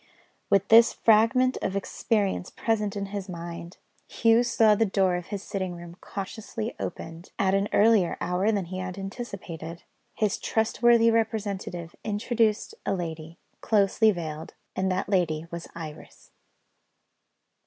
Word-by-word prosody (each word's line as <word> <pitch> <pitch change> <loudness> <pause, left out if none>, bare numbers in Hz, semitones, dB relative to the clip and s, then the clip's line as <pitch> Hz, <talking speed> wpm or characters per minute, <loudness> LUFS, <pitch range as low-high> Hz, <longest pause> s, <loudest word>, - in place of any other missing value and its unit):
With 200 0 +3
this 230 +1 +7
fragment 230 +4 +3
of 190 - -2
experience 200 -1 -1
present 210 -3 -1
in 200 -1 -3
his 200 -1 -4
mind, 170 0 -7 0.3
Hugh 230 +1 +3
saw 230 -3 +4
the 210 - +2
door 190 -3 +2
of 180 -1 -5
his 200 -1 -5
sitting 190 -4 -4
room 170 0 -10
cautiously 220 +3 -5
opened, 165 0 -6
at 190 -1 +2
an 195 +1 +1
earlier 210 -4 +4
hour 185 +4 +1
than 200 -4 -1
he 185 +2 -6
had 185 0 -5
anticipated. 185 -5 -7 0.3
His 210 -3 0
trustworthy 230 +1 +3
representative 200 -6 -2
introduced 220 - 0
a 195 - 0
lady, 165 -2 -6 0.2
closely 215 +1 +3
veiled 160 -5 -4 0.2
and 190 0 0
that 185 +1 -1
lady 165 -5 0
was 170 0 -6
Iris. 155 -3 -10
195 Hz, 135 wpm, -26 LUFS, 175-220 Hz, 0.3 s, this